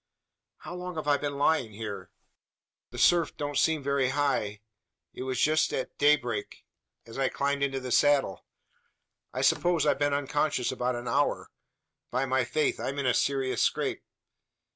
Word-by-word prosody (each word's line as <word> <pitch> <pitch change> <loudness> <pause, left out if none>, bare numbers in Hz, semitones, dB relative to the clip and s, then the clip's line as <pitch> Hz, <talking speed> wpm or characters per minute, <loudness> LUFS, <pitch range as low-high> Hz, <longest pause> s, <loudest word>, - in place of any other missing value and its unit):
"How - - -8
long 180 0 -6
have 155 -2 -5
I 145 -1 +4
been 140 -1 -4
lying 140 -6 +1
here? 105 -1 -6 0.8
The - - -10
surf 175 -2 +3
don't 145 -1 -2
seem 155 -2 +2
very 140 -2 +1
high. 130 -7 -1 0.5
It - - -8
was 130 0 -2
just 155 +1 +3 0.3
daybreak, 130 -7 +1 0.4
as 115 +3 -9
I 135 - +2
climbed 140 0 -1
into 135 -1 0
the 130 -1 -6
saddle. 140 - +3 0.9
I - - -3
suppose 175 -4 +2
I've 145 - +2
been 145 0 +2
unconscious 145 -2 0
about 125 -1 -1
an 120 0 -6
hour. 140 +5 0 0.6
By 130 +2 0
my 130 -1 +1
faith, 155 +6 0
I'm 140 - -3
in 140 - -2
a 125 - +3
serious 135 0 0
scrape? - - 0
140 Hz, 160 wpm, -28 LUFS, 125-145 Hz, 0.9 s, I